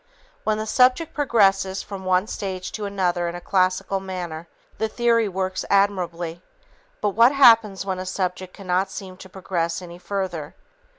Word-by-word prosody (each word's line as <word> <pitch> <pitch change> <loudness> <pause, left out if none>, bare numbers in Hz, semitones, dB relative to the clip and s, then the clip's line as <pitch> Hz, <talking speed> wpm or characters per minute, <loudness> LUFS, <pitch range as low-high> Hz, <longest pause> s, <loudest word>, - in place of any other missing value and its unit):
When 215 0 +1
the 215 - -3
subject 255 +8 +3
progresses 195 -8 +2
from 195 -2 -8
one 185 +1 +2
stage 190 -4 -5
to 210 - -5
another 180 -3 0
in 170 - -6
a - - -5
classical 185 +1 +1
manner, 175 -4 -6 0.3
the 220 - +1
theory 230 -1 +2
works 185 0 -2
admirably, 175 -4 0 0.6
but 210 - +2
what 230 +6 +5
happens 225 -8 +5
when 190 -2 -2
a 185 - -4
subject 185 -1 -3
cannot 190 0 -1
seem 190 -1 -8
to 190 - -12
progress 170 -3 -2
any 175 -1 -10
further? 180 -4 -4
190 Hz, 160 wpm, -23 LUFS, 180-205 Hz, 0.6 s, what